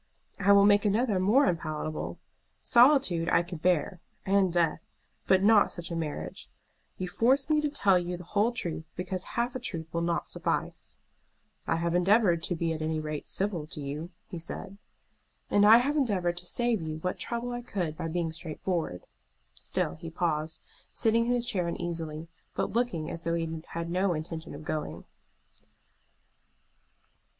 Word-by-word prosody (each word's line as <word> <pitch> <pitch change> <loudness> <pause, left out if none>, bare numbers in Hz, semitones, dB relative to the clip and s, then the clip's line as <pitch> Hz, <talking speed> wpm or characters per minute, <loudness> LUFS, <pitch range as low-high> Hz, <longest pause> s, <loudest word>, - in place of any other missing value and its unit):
"I 200 0 +4
will 200 0 +7
make 205 0 +5
another 210 -1 +2
more 215 +10 +4
unpalatable. 155 -3 -2 0.4
Solitude 240 - +4
I - - +4
could 175 -2 -8
bear, 180 +1 +1 0.3
and 195 -1 +3
death, 170 -2 +1 0.5
but 190 0 +4
not 210 0 +5
such 175 -1 -6
a - - -2
marriage. 150 - -5 0.5
You 185 - -3
force 265 - +2
me 305 0 +4
to 300 - 0
tell 200 -10 +3
you 175 0 -4
the 180 - -9
whole 205 +6 +1
truth 165 -8 -4
because 185 +1 -3
half 240 +1 0
a - - -2
truth 165 -9 -4
will 170 - 0
not 170 0 -1
suffice." - - -3 0.7
"I - - +2
have 170 +1 -1
endeavored 180 -1 +4
to 175 +1 -1
be 165 0 -1
at 155 - -5
any 155 0 -1
rate 155 -1 -5
civil 190 -6 -1
to 155 - -8
you," 145 +4 -5 0.2
he 175 - -6
said. 195 +4 -7 0.7
"And 205 0 +5
I 225 +2 +10
have 275 +5 +1
endeavored 190 - +1
to 180 0 -5
save 240 -3 0
you 155 -1 -4
what 180 +3 -3
trouble 240 +1 -3
I 240 0 -4
could 180 -9 -3
by 165 - -4
being 165 0 -1
straightforward." 160 - -4 0.5
Still - - -2
he 165 +1 -8
paused, 160 -2 -2 0.3
sitting 230 +1 +2
in - - +1
his 245 -1 +1
chair 185 -7 -1
uneasily, 165 -2 -4 0.3
but - - -1
looking 230 -10 -1
as 165 - -6
though 165 0 -1
he 165 -1 -3
had 170 0 -4
no 185 0 +1
intention 160 0 -6
of 145 - -9
going. 155 0 -4
175 Hz, 170 wpm, -29 LUFS, 165-205 Hz, 0.7 s, I